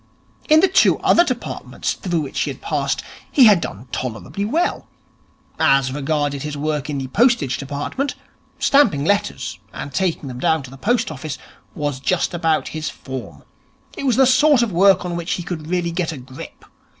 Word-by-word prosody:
In 310 +1 +7
the 385 - +5
two 380 +1 +4
other 345 - +5
departments 255 -8 -3
through 175 -5 -2
which 140 - -4
he - - 0
had - - -7
passed, - - -1 0.3
he 265 - +6
had 205 -6 +6
done 110 +6 -6
tolerably 130 - -4
well. 325 +11 -1 0.7
As 135 -4 +3
regarded 145 -1 -1
his 150 0 -5
work 150 -1 -2
in 145 - -2
the 135 - -3
Postage 200 - +2
Department, 145 - -3 0.4
stamping 220 - +3
letters 125 - -1
and 140 - -7
taking 180 -6 -1
them 125 -1 -7
down 160 -2 +1
to 130 - -11
the - - -10
post 235 - 0
office 150 0 -6 0.4
was 145 -3 -2
just 180 +7 0
about 165 -2 0
his 155 -1 -4
form. 130 -2 -8 0.5
It 280 - -3
was 250 - +3
the 265 - +5
sort 260 0 +5
of 230 - -1
work 190 +1 +4
on 175 -1 -3
which 170 +1 -2
he 175 - -3
could 165 -4 -6
really 175 0 -1
get 170 -1 -1
a 155 - -7
grip. 130 +1 -11
160 Hz, 185 wpm, -20 LUFS, 140-205 Hz, 0.7 s, In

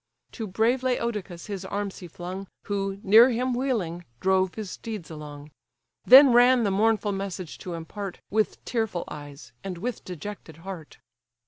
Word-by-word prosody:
To 225 -3 -5
brave 225 +6 +1
Laodocus 235 -8 -2
his 200 -3 -5
arms 200 +1 -4
he 180 - -9
flung, 180 +3 -7 0.2
Who, 195 -1 -2
near 220 +5 +8
him 250 +1 0
wheeling, 220 -10 -1 0.2
drove 190 -1 +2
his 215 -4 -5
steeds 215 -8 -7
along; 150 -1 -9 0.5
Then 265 +1 +9
ran 245 0 +6
the 200 - +1
mournful 215 +1 +2
message 195 -4 -5
to 175 -2 -6
impart, 180 +3 -6
With 215 +1 0
tearful 220 -7 -1
eyes, 145 -3 -10
and 190 -2 -5
with 235 +6 -4
dejected 180 -2 -8
heart. 180 -6 -8
195 Hz, 150 wpm, -26 LUFS, 175-225 Hz, 0.5 s, Then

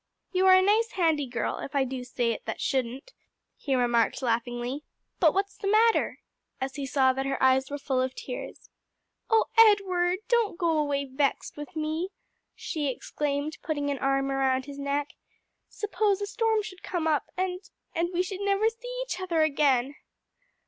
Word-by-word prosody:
"You 375 0 +3
are 375 - +9
a 375 - +5
nice, 435 +4 +2
handy 320 -6 +1
girl, 240 -1 -2
if 285 - -7
I 275 - +4
do 260 -1 -4
say 245 -1 -1
it 225 - -5
that 220 - -3
shouldn't," 260 - -2 0.4
he 275 -2 -1
remarked 240 0 +2
laughingly. 240 +3 -1 0.4
"But 320 -4 +5
what's 395 +1 0
the 395 - -4
matter?" 445 +3 +3 0.4
as 265 0 -3
he 280 -2 -4
saw 260 -1 +3
that 270 +1 -2
her 275 - -1
eyes 265 0 +3
were 285 - -3
full 270 -2 0
of 260 0 -2
tears. 250 - -8 0.6
"O 450 -1 +4
Edward, 375 -5 +5
don't 460 -7 +2
go 335 -2 +1
away 285 -1 0
vexed 275 +1 -1
with 295 -2 -9
me!" 315 +3 -2 0.5
she 305 -4 -3
exclaimed, 285 +3 -3
putting 290 -2 -2
an 275 - -3
arm 275 0 +1
around 265 -1 +1
his 285 0 -9
neck. 280 +1 -1 0.6
"Suppose 415 -1 0
a 405 - -2
storm 440 +1 +1
should 375 -3 -9
come 345 -3 -3
up, 310 -2 +1
and 365 0 -1 0.3
and 340 +1 0
we 360 0 +1
should 385 +1 -6
never 400 +2 +2
see - - -7
each 435 -7 -5
other 340 -4 +1
again." 280 -3 +2
295 Hz, 175 wpm, -27 LUFS, 265-375 Hz, 0.6 s, are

